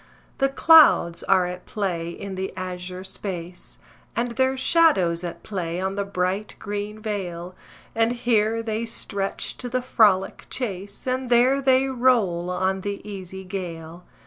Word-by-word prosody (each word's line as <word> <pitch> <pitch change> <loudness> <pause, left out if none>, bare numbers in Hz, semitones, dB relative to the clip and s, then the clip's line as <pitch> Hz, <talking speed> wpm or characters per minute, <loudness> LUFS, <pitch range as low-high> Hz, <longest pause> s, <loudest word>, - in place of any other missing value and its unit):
The 270 0 +3
clouds 275 - +6
are 190 -2 +3
at 180 0 -7
play 175 -5 -2
in 195 +3 -7
the 190 0 -4
azure 185 0 -5
space, 180 -2 -7 0.4
And 235 +1 -1
their 260 +2 +1
shadows 260 - +3
at 170 -1 -6
play 175 -4 -3
on 190 +1 -1
the 200 0 -1
bright 195 +1 -2
green 205 +1 -5
vale, 185 -5 -4 0.4
And 225 +1 +2
here 230 -2 +1
they 225 +1 -2
stretch 200 -3 -3
to 245 - -5
the 255 0 -1
frolic 205 -6 +2
chase, 200 -5 -5
And 255 0 -2
there 250 +3 +4
they 260 0 +4
roll 235 -10 +2
on 190 +1 0
the 200 +1 -5
easy 190 -2 -7
gale. 175 -3 -7
200 Hz, 145 wpm, -24 LUFS, 180-235 Hz, 0.4 s, clouds